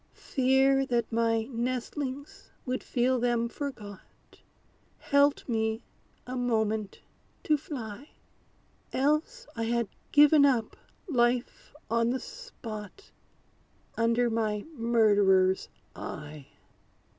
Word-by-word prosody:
Fear 270 0 +2
that 240 -2 0
my 225 0 +1
nestlings 255 +3 -4 0.2
would 255 -1 -2
feel 250 +1 +1
them 240 -1 +1
forgot, 235 -7 -9 0.6
Helped 285 0 +2
me 220 -1 -1 0.4
a 255 - -5
moment 220 -4 -1 0.4
to 305 - +3
fly; 270 -3 -7 0.8
Else 305 - 0
I 230 -1 -2
had 235 -1 0 0.2
given 295 0 +7
up 250 -6 +2 0.3
life 245 -2 0
on 230 +1 +1
the 260 +2 -1
spot, 245 - -9 0.8
Under 230 +1 +2
my 215 -2 -1
murderer's 205 -6 +3 0.3
eye. 150 -2 -8
240 Hz, 95 wpm, -29 LUFS, 220-270 Hz, 0.8 s, given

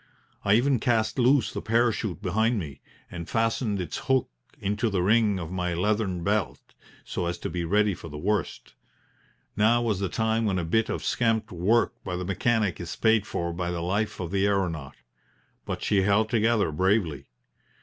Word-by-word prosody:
I 100 +1 +4
even 130 +2 +3
cast 110 -1 +1
loose 125 -1 +3
the - - -4
parachute 110 -3 0
behind 110 +5 +1
me, 75 -7 -6 0.3
and 85 -2 -7
fastened 115 -2 0
its 90 - -4
hook 130 - +2 0.3
into 105 +4 -1
the 95 -4 0
ring 105 0 +3
of 85 -2 -6
my 90 -1 -2
leathern 95 -1 0
belt, 105 -1 -2 0.3
so 90 - -3
as 85 0 -2
to - - -5
be 90 -1 -2
ready 105 +3 +2
for 85 -1 -9
the 75 - -7
worst. 100 +2 -2 0.8
Now 115 +3 +3
was 110 -5 0
the 100 -2 -1
time 110 +3 0
when 100 -3 +1
a 85 - -1
bit 110 +7 +1
of - - -3
scamped 115 -2 0
work 95 +7 +2
by 90 -2 -4
the 90 0 -4
mechanic 105 +1 0
is 85 - -5
paid 110 -2 +2
for 85 0 -3
by 85 0 -3
the 85 -1 -3
life 100 +5 -1
of 90 -2 -4
the 100 0 +2
aeronaut. 85 -9 -1 0.7
But - - -4
she 100 -2 +2
held 105 +3 +2
together 110 -6 +2
bravely. 90 -3 0
100 Hz, 180 wpm, -26 LUFS, 90-110 Hz, 0.8 s, I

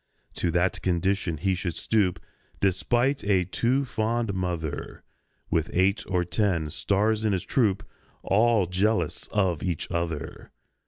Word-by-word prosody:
To 90 - 0
that 85 +2 +1
condition 90 -1 0
he 95 +5 +1
should 90 -2 -3
stoop 95 -6 +1 0.4
(Despite 120 +8 +1
a 95 -3 +2
too 120 +9 +1
fond 115 -2 -1
mother), 85 -5 -4 0.5
With 80 0 +1
eight 95 +3 +2
or 90 -2 0
ten 90 -5 0
"stars" 105 - +1
in 110 -2 +2
his 90 - -1
troupe, 105 -7 +1 0.4
All 110 0 +3
jealous 90 -1 0
of 95 -6 0
each 90 -4 -3
other! 85 -3 -4
95 Hz, 130 wpm, -26 LUFS, 85-110 Hz, 0.5 s, All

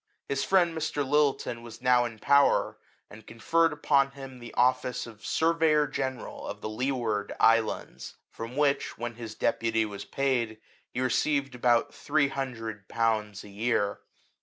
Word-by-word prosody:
His 140 0 -1
friend 175 -3 +3
Mr. 150 -3 -2
Lyttelton 140 -4 +1
was 115 -1 -11
now 125 -1 +4
in 115 -2 -6
power, 140 +5 +3 0.3
and 105 +1 -14
conferred 165 +8 +2
upon 140 -2 +2
him 135 -2 -10
the 120 -1 -9
office 125 0 +1
of 110 -3 -13
surveyor 160 -2 +2
general 135 -2 -4
of - - -6
the - - -4
Leeward 110 -3 -2
Islands; 115 -1 +1 0.2
from 115 +2 -7
which, 145 -1 +1
when 120 0 -4
his 115 -2 -8
deputy 115 -1 +1
was 100 -2 -7
paid, 125 -5 -1 0.3
he 125 - -4
received 135 +2 +1
about 125 +3 +2
three 145 -1 +1
hundred 115 -7 -5
pounds 110 -3 -1
a 105 - -12
year. 100 0 0
125 Hz, 150 wpm, -28 LUFS, 115-140 Hz, 0.3 s, now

